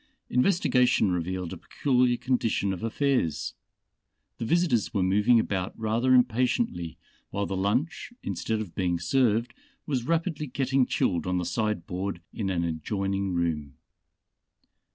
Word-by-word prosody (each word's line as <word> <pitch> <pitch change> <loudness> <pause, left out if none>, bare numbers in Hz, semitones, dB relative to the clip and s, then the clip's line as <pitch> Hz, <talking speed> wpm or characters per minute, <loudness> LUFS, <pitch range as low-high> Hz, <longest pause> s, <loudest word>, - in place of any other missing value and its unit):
Investigation 125 - +3
revealed 90 0 -2
a - - -6
peculiar 125 -3 +1
condition 115 -6 0
of 90 - -6
affairs. 125 - 0 0.9
The 115 - -2
visitors 140 - +1
were 95 - +2
moving 105 +6 +4
about 95 -4 -2
rather 115 +4 +2
impatiently 125 - +1 0.3
while 100 0 -2
the 95 - -3
lunch, 125 - -1
instead 110 -1 -2
of 100 -6 -7
being 90 -2 0
served, 115 +4 +1 0.3
was 130 -4 -2
rapidly 165 -2 0
getting 135 0 +1
chilled 85 - 0
on 90 0 +1
the 90 - -1
side 105 -5 -1
board 95 0 -3
in 100 -4 -2
an 85 -2 0
adjoining 95 +3 -2
room. 75 -5 -1
110 Hz, 130 wpm, -27 LUFS, 90-125 Hz, 0.9 s, moving